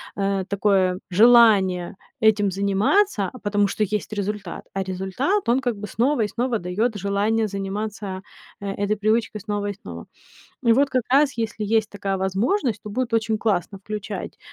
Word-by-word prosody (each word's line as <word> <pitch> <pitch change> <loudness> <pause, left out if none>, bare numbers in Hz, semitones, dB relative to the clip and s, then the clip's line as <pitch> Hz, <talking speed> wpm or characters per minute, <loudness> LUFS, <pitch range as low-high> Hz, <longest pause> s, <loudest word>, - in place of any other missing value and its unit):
э, 195 -1 0
такое 195 -2 +1
желание 200 -4 +5 0.2
этим 215 -3 +3
заниматься, 200 - +1
а 255 - -11
потому 205 -1 +1
что 215 - -1
есть 210 +1 -2
результат, 205 0 -4
а 195 - -1
результат 190 - -1
он 250 +3 +4
как 240 -4 -1
бы 210 +1 -6
снова 245 +5 +1
и 210 - +2
снова 235 +2 -1
дает 210 +6 -1
желание 205 +3 0
заниматься, 200 0 -4 0.4
э, - - -6
этой 205 +2 -1
привычкой 215 +1 0
снова 205 -1 -3
и 205 - -2
снова. 200 - -10 0.6
И 235 - +4
вот 275 +3 +3
как 255 -2 +1
раз, 280 0 +4
если 220 -1 -3
есть 220 0 +1
такая 200 -1 -3
возможность, 215 - 0
то 210 - -7
будет 245 +1 -2
очень 220 -1 +1
классно 200 -2 -1
включать 210 +1 -6
210 Hz, 165 wpm, -23 LUFS, 195-230 Hz, 0.6 s, желание